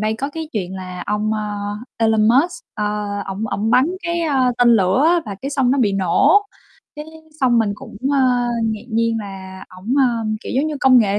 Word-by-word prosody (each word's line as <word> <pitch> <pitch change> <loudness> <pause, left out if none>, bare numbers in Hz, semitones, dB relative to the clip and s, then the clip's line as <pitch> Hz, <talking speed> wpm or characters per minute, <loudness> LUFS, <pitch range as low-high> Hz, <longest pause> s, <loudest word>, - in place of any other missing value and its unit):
đây 215 +1 0
có 275 +3 -2
cái 320 +1 -6
chuyện 190 -4 -3
là 185 -1 -7
ông, 210 +1 -1
a, 210 -1 -3 0.4
Elon 220 -1 +3
Musk, 345 - +2
ơ, 210 - -2 0.4
ổng 195 +3 -4
ổng 215 +1 -2
bắn 255 +4 +4 0.2
cái, 340 0 -1
ơ, 270 -6 +1
tên 245 -1 +5
lửa 190 +7 +2
á, 345 0 +3
và 205 - -5
cái 275 - -3
xong 270 -3 +1
nó 275 - +2
bị 210 -5 +2
nổ, 195 - +3 0.5
cái 300 - -6 0.4
xong 245 -3 +3
mình 215 -3 +1
cũng, 205 - -12 0.2
ơ, 250 -3 +2 0.2
ngạc 220 -1 -2
nhiên 230 0 +1
là 190 -2 -8
ổng, 220 +8 -2
ơ, 240 -4 +2 0.2
kiểu - - -6
giống 280 +3 +2
như, 310 - -3
công 260 -1 +6
nghệ 205 -3 +2
225 Hz, 210 wpm, -19 LUFS, 205-270 Hz, 0.5 s, công